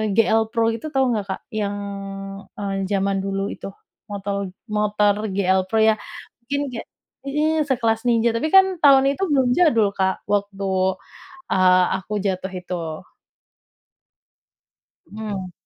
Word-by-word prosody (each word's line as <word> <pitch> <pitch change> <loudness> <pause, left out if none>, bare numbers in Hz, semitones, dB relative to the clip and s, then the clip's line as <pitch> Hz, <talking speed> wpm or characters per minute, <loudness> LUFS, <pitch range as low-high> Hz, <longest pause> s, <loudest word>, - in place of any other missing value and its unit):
GL 225 0 +3
Pro 225 0 +1
itu, 230 +7 -5
tau 265 -4 +1
nggak 210 -3 -1
Kak? 190 - -4
Yang 205 -2 -2 0.8
e - - -8 0.3
jaman 195 -1 0
dulu 195 0 -2
itu, - - -7 0.4
motol 200 -2 -4 0.2
motor 210 -1 +2 0.2
GL 190 -1 +3
Pro 220 - -1
ya, 220 -1 +4 0.4
mungkin 280 +4 -3
kayak 230 - -7 0.4
mhm, 305 +1 +1
sekelas 230 -4 +1
Ninja, 235 0 +3
tapi 230 +7 -1
kan 380 -2 +5
tahun 275 -3 +6
itu 380 +7 -3
belum 265 -3 +3
jadul 235 - +3
Kak, 190 -1 -1
waktu, 200 -1 -1 0.9
eee, 185 -1 +5 0.2
aku 200 +2 -8
jatuh 190 -1 -2
itu. 180 0 -5 2.4
Mhm. 200 -4 -5
210 Hz, 130 wpm, -22 LUFS, 195-245 Hz, 2.4 s, tahun